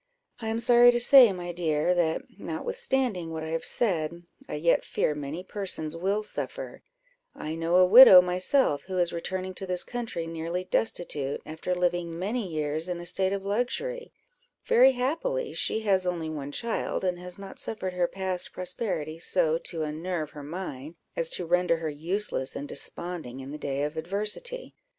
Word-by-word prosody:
"I 225 - -5
am 220 0 -1
sorry 240 +1 +6
to 240 0 +3
say, 245 -2 +8
my 175 -2 -5
dear, 165 -1 +1
that 170 -3 +1 0.2
notwithstanding 265 - -2
what 160 -1 -5
I 160 - -5
have 165 0 -2
said, 170 -6 -1 0.3
I - - -3
yet 165 +3 +2
fear 150 - 0
many 150 +4 -5
persons 185 -6 -3
will 195 +5 0
suffer; - - -6 0.5
I 155 - -5
know 165 +2 0
a 185 0 +7
widow 200 -1 +11
myself, 180 - +2
who 185 -1 -3
is 175 -1 +1
returning 185 +2 -4
to 190 +1 -5
this 180 -1 -1
country 230 -9 -4
nearly 165 +2 -3
destitute, 150 -8 -1
after 160 +4 -3
living 175 -2 -1
many 205 +4 -2
years 155 +1 -2
in 175 -1 -3
a 175 - -7
state 190 +2 0
of 195 -1 -3
luxury; 360 - -2 0.5
very 260 +3 +6
happily 445 - -1
she 220 - 0
has 190 -4 +2
only 165 -3 -2
one 145 -2 -5
child, 230 +5 -2
and 180 -1 -1
has 180 0 -7
not 195 -1 -10
suffered 190 -4 -4
her 180 -1 +1
past 190 -1 -3
prosperity 180 -4 -3
so 160 -1 +2
to 165 -1 -4
unnerve 155 +1 -3
her 150 - -9
mind, 150 -1 -7 0.2
as 165 -1 -1
to 180 - -1
render 180 0 +2
her 160 -1 -3
useless 165 -2 -2
and 145 - -5
desponding 155 -3 -4
in 135 +1 -8
the 150 - -6
day 140 -1 -2
of 150 +2 -3
adversity. 210 - -4
180 Hz, 175 wpm, -27 LUFS, 160-205 Hz, 0.5 s, widow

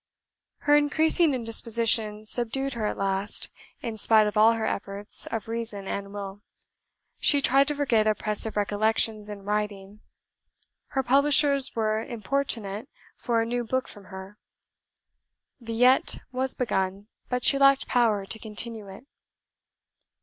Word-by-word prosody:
Her 290 0 +3
increasing 310 +1 +3
indisposition 225 -2 -1
subdued 250 +4 0
her 220 -3 -2
at - - -4
last, 195 +1 -2 0.3
in 225 -2 -5
spite 215 0 +5
of 210 - -3
all 220 +2 +5
her 225 -1 -3
efforts 200 +1 -1
of 225 -2 -5
reason 225 -4 -5
and 200 0 -5
will. 200 0 -8 0.8
She 285 - +4
tried 275 0 +3
to 295 - -1
forget 240 -7 +1
oppressive 215 0 0
recollections 210 +1 0
in 205 -1 -8
writing. 205 -1 -4 0.9
Her 270 - -2
publishers 280 +1 +3
were 215 -1 0
importunate 225 -3 -3 0.3
for 230 -2 -1
a - - -4
new 240 +1 -2
book 260 +3 -2
from 205 -2 -12
her 190 +2 -11 1.2
pen. 235 - -18
"Villette" 245 +3 +3
was 260 +1 +1
begun, 195 -4 -2 0.2
but 250 -1 -2
she 275 - +5
lacked 275 0 +4
power 220 -5 +1
to 220 +3 -5
continue 220 0 -4
it. 195 +7 -12
225 Hz, 135 wpm, -26 LUFS, 205-255 Hz, 1.2 s, spite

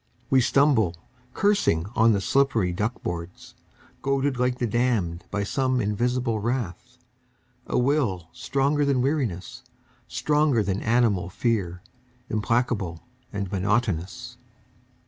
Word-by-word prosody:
We 130 -1 +5
stumble, 125 - +3 0.4
cursing, 200 - +2
on 115 0 +5
the 100 -2 +1
slippery 115 -8 +2
duck 105 +7 -2
boards. 85 +1 -6 0.5
Goaded 135 -1 0
like 125 0 +1
the 125 - 0
damned 110 -7 0
by 100 0 -1
some 130 +4 0
invisible 120 +2 0
wrath, 120 +1 -3 0.7
A - - 0
will 125 - +1
stronger 140 +2 0
than 135 -3 +2
weariness, 125 - -2 0.5
stronger 150 -6 +2
than 100 0 -2
animal 110 -6 +2
fear, 100 -4 -1 0.5
Implacable 110 -6 0 0.3
and 100 -2 -4
monotonous. 100 -2 -1
115 Hz, 110 wpm, -25 LUFS, 95-130 Hz, 0.7 s, We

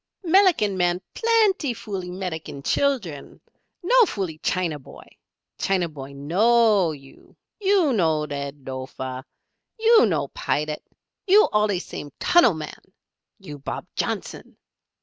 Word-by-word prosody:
"Melican 335 - +3
man 175 0 +1
plenty 430 - +2
foolee 190 -5 -6
Melican 160 -6 -6
chillern. 210 - -1 0.4
No - - +5
foolee 175 -6 -4
China 170 -5 -1
boy! 135 - -14 0.5
China 185 -3 +1
boy 140 -3 -10
knowee 195 +3 +3
you. 135 0 -19 0.2
You 385 -8 +3
no 160 -7 +2
Led 140 -2 -6
Lofer. 130 0 -6 0.5
You 450 - +5
no 150 -7 -1
Pilat 150 0 -2 0.5
you 415 +3 +6
allee 210 -2 +2
same 150 -4 -7
tunnel 295 - +4
man 155 -1 -8 0.6
you 145 -1 -10
Bob 140 - -5
Johnson! - - -4
180 Hz, 115 wpm, -23 LUFS, -, 0.6 s, you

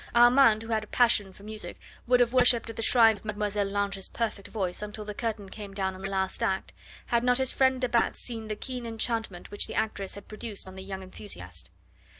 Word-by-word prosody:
Armand, 240 -2 +6
who 225 - -9
had 220 -1 +1
a - - -11
passion 220 -5 +3
for 195 - -16
music, 215 0 -5 0.3
would 250 0 +5
have 245 0 +3
worshipped 245 -2 +4
at - - -12
the - - -4
shrine 225 -2 +6
of - - -17
Mlle. 210 -1 0
Lange's 200 -1 -2
perfect 215 -4 -3
voice 190 -4 -3
until 210 0 -5
the 210 - -5
curtain 215 -2 -3
came 200 0 -9
down 190 -1 -1
on 185 - -10
the 195 - -3
last 190 -1 -1
act, 190 0 -1 0.3
had 235 0 +1
not 250 0 +4
his 265 -1 +2
friend 260 -1 +3
de 250 - +2
Batz 235 -1 +1
seen 225 -3 -5
the 215 - -3
keen 250 +1 -5
enchantment 225 -5 -2
which 205 - -2
the - - -6
actress 215 -3 -2
had 200 - -11
produced 215 -2 -5
on 190 - -9
the 190 - -8
young 190 0 -6
enthusiast. 90 - -7
215 Hz, 225 wpm, -28 LUFS, 195-235 Hz, 0.3 s, Armand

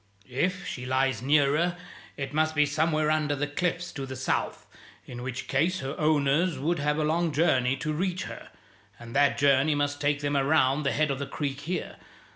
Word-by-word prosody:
If 180 +9 -1
she 125 0 -5
lies 130 -3 +1
nearer, 150 +5 +2 0.4
it 140 0 -5
must 155 +1 +1
be 150 -1 +4
somewhere 155 +1 +1
under 150 -2 +1
the 145 +1 -1
cliffs 175 +4 -2
to 135 -1 -6
the 130 - -6
south, 130 +1 -2 0.4
in 120 -1 -8
which 130 +1 -5
case 165 +6 +1
her 135 +2 -4
owners 155 +2 +2
would 165 +5 -1
have 150 +1 0
a 155 - +1
long 165 +2 +1
journey 135 -4 +2
to 155 +4 -3
reach 185 +3 -1
her, - - -9 0.5
and 120 +1 -10
that 140 0 +3
journey 140 +1 +3
must 145 0 -1
take 145 0 +1
them 145 0 -1
around 140 0 +3
the 140 -2 0
head 155 -1 +1
of 135 - -3
the 140 - -4
creek 140 -1 -3
here. 175 +5 -4
145 Hz, 195 wpm, -27 LUFS, 135-155 Hz, 0.5 s, be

